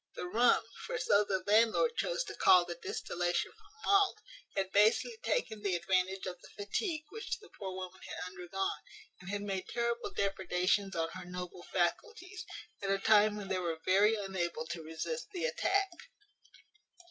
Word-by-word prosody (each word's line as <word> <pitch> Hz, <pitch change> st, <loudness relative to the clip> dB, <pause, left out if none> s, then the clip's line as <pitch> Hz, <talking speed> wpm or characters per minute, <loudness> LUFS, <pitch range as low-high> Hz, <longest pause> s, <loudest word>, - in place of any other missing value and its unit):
The -, -, -4 dB
rum 230 Hz, +7 st, +4 dB, 0.2 s
(for -, -, -2 dB
so 205 Hz, -, +4 dB
the 190 Hz, -2 st, -1 dB
landlord 225 Hz, -, +4 dB
chose -, -, 0 dB
to -, -, -7 dB
call 180 Hz, -1 st, +6 dB
the 175 Hz, -, -4 dB
distillation 175 Hz, +1 st, -2 dB
from -, -, -22 dB, 0.2 s
malt) 395 Hz, -1 st, +4 dB, 0.4 s
had 190 Hz, -1 st, -1 dB
basely 215 Hz, -, +4 dB
taken 220 Hz, -, -1 dB
the 200 Hz, -3 st, +1 dB
advantage 185 Hz, +2 st, +1 dB
of 180 Hz, -1 st, -6 dB
the -, -, -14 dB
fatigue 305 Hz, -, -2 dB
which 445 Hz, 0 st, -4 dB
the 430 Hz, -, -16 dB
poor 190 Hz, -2 st, -6 dB
woman 185 Hz, 0 st, -7 dB
had -, -, -5 dB
undergone, 185 Hz, +1 st, -3 dB, 0.4 s
and 185 Hz, -, -9 dB
had 205 Hz, 0 st, -2 dB
made 195 Hz, -2 st, -3 dB
terrible 235 Hz, 0 st, -1 dB
depredations 195 Hz, 0 st, 0 dB
on 165 Hz, -1 st, 0 dB
her 185 Hz, 0 st, -8 dB
noble 180 Hz, 0 st, -6 dB
faculties, 375 Hz, -, -1 dB, 0.4 s
at 195 Hz, -, -2 dB
a 195 Hz, -, +3 dB
time 210 Hz, +1 st, +5 dB
when 205 Hz, -2 st, -6 dB
they 190 Hz, -1 st, 0 dB
were 165 Hz, -3 st, -2 dB
very 205 Hz, +4 st, +5 dB
unable 180 Hz, -6 st, -2 dB
to 170 Hz, -1 st, -4 dB
resist 160 Hz, -, -4 dB
the 360 Hz, -, -1 dB
attack. 395 Hz, -6 st, +1 dB
195 Hz, 170 wpm, -33 LUFS, 180-235 Hz, 0.4 s, call